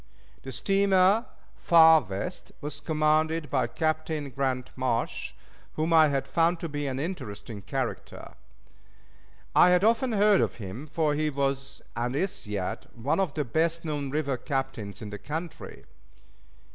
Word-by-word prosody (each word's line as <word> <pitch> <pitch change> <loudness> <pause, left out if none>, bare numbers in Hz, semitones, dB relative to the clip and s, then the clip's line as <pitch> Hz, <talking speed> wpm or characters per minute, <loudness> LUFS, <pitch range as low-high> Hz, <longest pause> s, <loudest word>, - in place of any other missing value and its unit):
The 130 - -8
steamer 195 - +3 0.3
Far 160 -2 +7
West 95 -5 -6
was 145 0 -6
commanded 155 +1 +1
by 130 -4 +1
Captain 155 0 -2
Grant 130 -1 -2
Marsh, 125 -3 -2 0.4
whom 160 +2 0
I 155 -4 +5
found 170 +4 +1
to 170 - -2
be 145 -2 -3
an 130 -1 -3
interesting 125 - -6
character. - - -5 1.2
I 180 - +7
had 180 +1 +4
often 230 +2 +3
heard 205 -1 +4
of - - 0
him, 110 +7 -7
for 155 0 0
he 155 +1 0
was, 135 -1 -3
and 120 +2 -2
is 175 - -2
yet, 100 -3 -4
one 125 +10 0
of 185 -7 0
the 150 - 0
best 165 +6 0
known 145 -3 -3
river 140 -2 -1
captains 120 -7 -4
in 105 - -7
the 105 - -6
country. 160 +3 -7
150 Hz, 145 wpm, -27 LUFS, 130-165 Hz, 1.2 s, Far